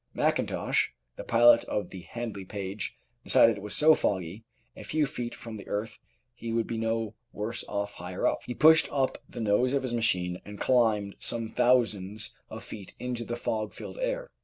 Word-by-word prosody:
Mackintosh, -, -, +1 dB, 0.3 s
the -, -, -7 dB
pilot 115 Hz, 0 st, +6 dB
of 100 Hz, -4 st, -3 dB
the 95 Hz, -, -8 dB
Handley 115 Hz, 0 st, -6 dB
Page, 100 Hz, +1 st, -5 dB, 0.3 s
decided 115 Hz, -, +6 dB
as 110 Hz, -, -4 dB
it -, -, -8 dB
was 105 Hz, +1 st, 0 dB
so 155 Hz, +1 st, +7 dB
foggy 95 Hz, -, -1 dB, 0.3 s
a -, -, -10 dB
few 155 Hz, -1 st, +1 dB
feet 120 Hz, -3 st, -5 dB
from 115 Hz, -2 st, -8 dB
the 100 Hz, -, -11 dB
earth 110 Hz, +2 st, -3 dB, 0.3 s
he 115 Hz, -1 st, -6 dB
would 115 Hz, 0 st, +1 dB
be 115 Hz, -, -3 dB
no 115 Hz, -1 st, -1 dB, 0.2 s
worse 110 Hz, +3 st, -3 dB
off 100 Hz, 0 st, -3 dB
higher 90 Hz, +2 st, -4 dB
up. -, -, +2 dB
He 125 Hz, -, -4 dB
pushed 160 Hz, +1 st, +6 dB
up 135 Hz, -2 st, 0 dB
the -, -, -8 dB
nose 115 Hz, +5 st, +2 dB
of 140 Hz, -1 st, +1 dB
his 125 Hz, -2 st, -2 dB
machine 90 Hz, -6 st, 0 dB
and 105 Hz, -1 st, -10 dB
climbed 110 Hz, -5 st, +2 dB
some 115 Hz, -1 st, -3 dB
thousands 110 Hz, -4 st, +1 dB
of -, -, -8 dB
feet 100 Hz, -3 st, -8 dB
into 125 Hz, -1 st, -3 dB
the 120 Hz, +1 st, -4 dB
fog 110 Hz, -3 st, -2 dB
filled -, -, -8 dB
air. -, -, -2 dB
115 Hz, 190 wpm, -28 LUFS, 100-120 Hz, 0.3 s, so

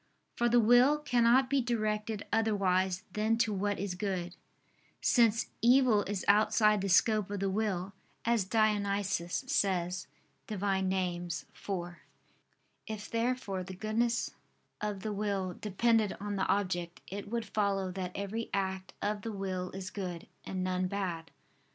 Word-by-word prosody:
For 240 Hz, -1 st, +2 dB
the 240 Hz, +1 st, +5 dB
will 245 Hz, +6 st, +6 dB
cannot 250 Hz, -2 st, +3 dB
be 275 Hz, 0 st, +2 dB
directed 215 Hz, -3 st, -1 dB
otherwise 190 Hz, -4 st, +1 dB
than 220 Hz, +2 st, +1 dB
to 225 Hz, -2 st, +1 dB
what 205 Hz, +1 st, -1 dB
is 195 Hz, -1 st, -3 dB
good: 180 Hz, -2 st, -3 dB, 0.6 s
since 230 Hz, -2 st, +3 dB
"evil 240 Hz, -2 st, +5 dB
is 200 Hz, -1 st, -3 dB
outside 210 Hz, 0 st, +4 dB
the 195 Hz, -, -1 dB
scope 210 Hz, +2 st, +4 dB
of 205 Hz, -1 st, -3 dB
the 195 Hz, 0 st, 0 dB
will," 195 Hz, -2 st, -1 dB, 0.3 s
as 230 Hz, -3 st, +3 dB
Dionysius 200 Hz, -2 st, 0 dB
says 185 Hz, -7 st, 0 dB, 0.4 s
(Div. 210 Hz, -4 st, -5 dB
Nom. 190 Hz, -2 st, +1 dB, 0.4 s
iv). 175 Hz, +3 st, -5 dB, 0.9 s
If 215 Hz, -1 st, -6 dB
therefore 230 Hz, -5 st, -1 dB
the 190 Hz, +1 st, -8 dB
goodness 225 Hz, +4 st, 0 dB, 0.5 s
of 210 Hz, -2 st, -3 dB
the 215 Hz, +1 st, -3 dB
will 200 Hz, -3 st, -1 dB
depended 215 Hz, +2 st, +1 dB
on 205 Hz, 0 st, -3 dB
the 190 Hz, -, 0 dB
object, 175 Hz, -3 st, -1 dB
it 200 Hz, +1 st, -7 dB
would 230 Hz, 0 st, -2 dB
follow 195 Hz, -2 st, 0 dB
that 180 Hz, -1 st, -4 dB
every 205 Hz, +3 st, -3 dB
act 190 Hz, -1 st, -3 dB
of 205 Hz, 0 st, -1 dB
the 225 Hz, -, -4 dB
will 190 Hz, -2 st, -3 dB
is 190 Hz, +1 st, -7 dB
good, 180 Hz, -4 st, -5 dB, 0.2 s
and 185 Hz, -1 st, -3 dB
none 185 Hz, 0 st, 0 dB
bad. 180 Hz, -4 st, -3 dB
205 Hz, 145 wpm, -31 LUFS, 190-220 Hz, 0.9 s, will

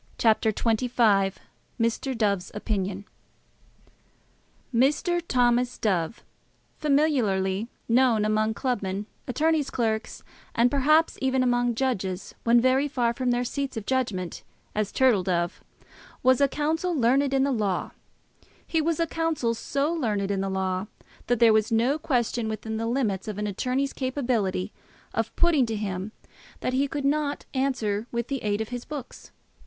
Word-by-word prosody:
CHAPTER 220 Hz, -1 st, +3 dB
XXV 220 Hz, -4 st, +2 dB, 0.4 s
Mr. 230 Hz, +3 st, 0 dB
Dove's 200 Hz, -4 st, 0 dB
Opinion 200 Hz, -2 st, -2 dB, 1.7 s
Mr. 300 Hz, +8 st, +2 dB
Thomas 245 Hz, 0 st, +2 dB
Dove, 190 Hz, -1 st, -1 dB, 0.6 s
familiarly 235 Hz, -9 st, +1 dB, 0.2 s
known 235 Hz, -3 st, +3 dB
among 215 Hz, +1 st, +1 dB
club 250 Hz, -4 st, -1 dB
men, 195 Hz, +1 st, -3 dB, 0.2 s
attorneys' 305 Hz, +2 st, +1 dB
clerks, 220 Hz, -2 st, -2 dB, 0.3 s
and, 240 Hz, +1 st, +4 dB
perhaps, 305 Hz, +4 st, +3 dB
even 265 Hz, -1 st, +2 dB
among 245 Hz, -1 st, +1 dB
judges 195 Hz, -8 st, -2 dB
when 235 Hz, +1 st, +5 dB
very 260 Hz, +3 st, +3 dB
far 245 Hz, -4 st, 0 dB
from 255 Hz, +1 st, -1 dB
their 245 Hz, 0 st, +1 dB
seats 275 Hz, 0 st, -3 dB
of 215 Hz, -, -5 dB
judgment, 215 Hz, -10 st, -2 dB, 0.3 s
as 210 Hz, -1 st, -1 dB
Turtle 255 Hz, -7 st, +4 dB
Dove, 175 Hz, -1 st, -1 dB, 0.6 s
was 260 Hz, +1 st, +4 dB
a 280 Hz, -, +6 dB
counsel 320 Hz, +5 st, -1 dB
learned 270 Hz, +2 st, +3 dB
in 270 Hz, -1 st, +3 dB
the 280 Hz, -, +1 dB
law. 210 Hz, -7 st, -1 dB, 0.7 s
He 325 Hz, -, +1 dB
was 325 Hz, +1 st, 0 dB
a 335 Hz, -, +3 dB
counsel 325 Hz, -8 st, -1 dB
so 280 Hz, +7 st, -1 dB
learned 210 Hz, -10 st, -1 dB
in 195 Hz, -1 st, 0 dB
the 195 Hz, -, -2 dB
law, 190 Hz, 0 st, -1 dB, 0.4 s
that 245 Hz, -, +2 dB
there 230 Hz, -2 st, +6 dB
was 215 Hz, 0 st, +2 dB
no 245 Hz, +7 st, +2 dB
question 240 Hz, -6 st, 0 dB
within 220 Hz, +1 st, -4 dB
the 225 Hz, +1 st, -2 dB
limits 230 Hz, -5 st, -1 dB
of 210 Hz, -2 st, -4 dB
an 210 Hz, -, -2 dB
attorney's 255 Hz, +7 st, -1 dB
capability 235 Hz, -8 st, -1 dB, 0.4 s
of 225 Hz, 0 st, -2 dB
putting 315 Hz, -8 st, +3 dB
to 225 Hz, -, -2 dB
him, 200 Hz, -1 st, -3 dB, 0.5 s
that 255 Hz, -, -1 dB
he 275 Hz, +2 st, +2 dB
could 285 Hz, -1 st, -4 dB
not 290 Hz, 0 st, 0 dB
answer 240 Hz, -6 st, -1 dB
with 235 Hz, 0 st, -3 dB
the 275 Hz, -2 st, -2 dB
aid 205 Hz, 0 st, 0 dB
of 220 Hz, -, -4 dB
his 245 Hz, -1 st, -5 dB
books. 285 Hz, -5 st, -8 dB
240 Hz, 150 wpm, -26 LUFS, 210-270 Hz, 1.7 s, a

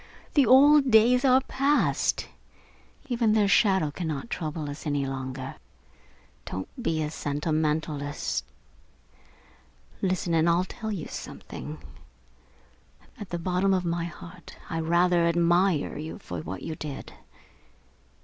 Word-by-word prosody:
The 280 Hz, -4 st, +4 dB
old 280 Hz, +1 st, +7 dB
days 240 Hz, +3 st, +5 dB
are 260 Hz, -1 st, +5 dB
passed. 275 Hz, +2 st, +1 dB, 0.8 s
Even 235 Hz, -4 st, +2 dB
their 210 Hz, -2 st, +3 dB
shadow 190 Hz, -5 st, +3 dB
cannot 160 Hz, -, -4 dB
trouble 155 Hz, -2 st, -3 dB
us 145 Hz, +2 st, -7 dB
any 145 Hz, -1 st, 0 dB
longer. 130 Hz, 0 st, -5 dB, 0.9 s
Don't 95 Hz, 0 st, -5 dB
be 160 Hz, -9 st, 0 dB
a 150 Hz, -, -3 dB
sentimentalist. 150 Hz, -1 st, -2 dB, 1.6 s
Listen 185 Hz, -3 st, 0 dB
and 165 Hz, +1 st, +3 dB
I'll 175 Hz, +2 st, +2 dB
tell 220 Hz, +3 st, -6 dB
you 190 Hz, -7 st, -4 dB
something -, -, -8 dB, 1.4 s
at 205 Hz, -, -7 dB
the 175 Hz, -, -3 dB
bottom 185 Hz, +3 st, +1 dB
of 180 Hz, -1 st, -1 dB
my 170 Hz, 0 st, -1 dB
heart 170 Hz, +1 st, -11 dB
I 165 Hz, -, -1 dB
rather 170 Hz, +1 st, +3 dB
admire 170 Hz, -1 st, +2 dB
you 155 Hz, +1 st, -6 dB
for 90 Hz, -, -7 dB
what 95 Hz, +3 st, -7 dB
you 160 Hz, -, -4 dB
did. 150 Hz, -3 st, -7 dB
170 Hz, 120 wpm, -27 LUFS, 150-200 Hz, 1.6 s, old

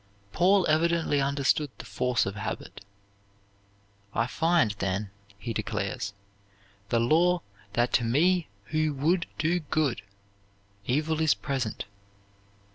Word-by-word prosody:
Paul 185 Hz, +3 st, +4 dB
evidently 160 Hz, -2 st, +2 dB
understood 140 Hz, +1 st, +1 dB
the -, -, -9 dB
force 125 Hz, -1 st, 0 dB
of 95 Hz, -, -3 dB
habit. 105 Hz, -1 st, -6 dB, 1.3 s
"I 115 Hz, -, +2 dB
find, 165 Hz, -3 st, +2 dB
then," 95 Hz, +1 st, -2 dB, 0.3 s
he 115 Hz, +3 st, -4 dB
declares, 100 Hz, -1 st, -3 dB, 0.8 s
"the 115 Hz, -, +2 dB
law, 170 Hz, +8 st, +3 dB, 0.3 s
that 120 Hz, +2 st, +1 dB
to 125 Hz, -, +4 dB
me 165 Hz, +8 st, +2 dB, 0.2 s
who 155 Hz, -1 st, +1 dB
would 170 Hz, +6 st, +1 dB
do 165 Hz, +3 st, +1 dB
good, 145 Hz, -7 st, 0 dB, 0.9 s
evil 155 Hz, +4 st, +1 dB
is 160 Hz, -2 st, +4 dB
present. 130 Hz, -8 st, -3 dB
140 Hz, 115 wpm, -28 LUFS, 115-160 Hz, 1.3 s, Paul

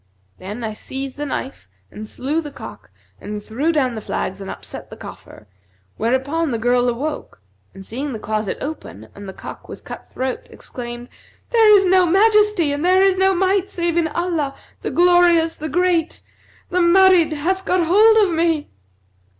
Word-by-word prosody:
Then 205 Hz, +6 st, -7 dB
I 220 Hz, -1 st, -3 dB
seized 265 Hz, +4 st, -6 dB
the 295 Hz, 0 st, -4 dB
knife 260 Hz, -, -6 dB, 0.2 s
and 215 Hz, 0 st, -8 dB
slew 290 Hz, +8 st, -2 dB
the 300 Hz, -, -7 dB
cock -, -, -11 dB, 0.3 s
and 210 Hz, 0 st, -6 dB
threw 270 Hz, +11 st, -1 dB
down 270 Hz, -6 st, 0 dB
the 220 Hz, -, -6 dB
flags 190 Hz, -1 st, -4 dB
and 195 Hz, -, -7 dB
upset -, -, -8 dB
the -, -, -11 dB
coffer, 105 Hz, -, -12 dB, 0.5 s
whereupon 265 Hz, +8 st, 0 dB
the 235 Hz, -, -1 dB
girl 245 Hz, +2 st, +2 dB
awoke 275 Hz, -, -5 dB, 0.4 s
and, 195 Hz, -, -10 dB
seeing 270 Hz, +7 st, -4 dB
the 230 Hz, -, -4 dB
closet 215 Hz, -1 st, -3 dB
open 110 Hz, -, -7 dB
and 200 Hz, -1 st, -10 dB
the -, -, -5 dB
cock -, -, -10 dB
with -, -, -10 dB
cut -, -, -10 dB
throat, 260 Hz, -1 st, -4 dB
exclaimed, 240 Hz, -1 st, -8 dB, 0.4 s
'There 445 Hz, -3 st, +6 dB
is 390 Hz, -, +2 dB
no 370 Hz, -1 st, +4 dB
Majesty 420 Hz, -3 st, +3 dB
and 290 Hz, +2 st, -3 dB
there 370 Hz, +2 st, +4 dB
is 380 Hz, -1 st, +3 dB
no 385 Hz, 0 st, +3 dB
Might 380 Hz, +1 st, +1 dB
save 340 Hz, -2 st, -2 dB
in 340 Hz, -2 st, +2 dB
Allah, 320 Hz, -4 st, -2 dB, 0.3 s
the -, -, -3 dB
Glorious, 350 Hz, -2 st, +4 dB
the 310 Hz, +1 st, -6 dB
Great! 345 Hz, +1 st, 0 dB, 0.5 s
The 360 Hz, -, +1 dB
Marid 350 Hz, -2 st, +5 dB
hath 370 Hz, +6 st, -1 dB
got 365 Hz, -3 st, +1 dB
hold 425 Hz, +4 st, +5 dB
of 350 Hz, -, -3 dB
me!' 325 Hz, -2 st, 0 dB
315 Hz, 175 wpm, -20 LUFS, 245-360 Hz, 0.5 s, There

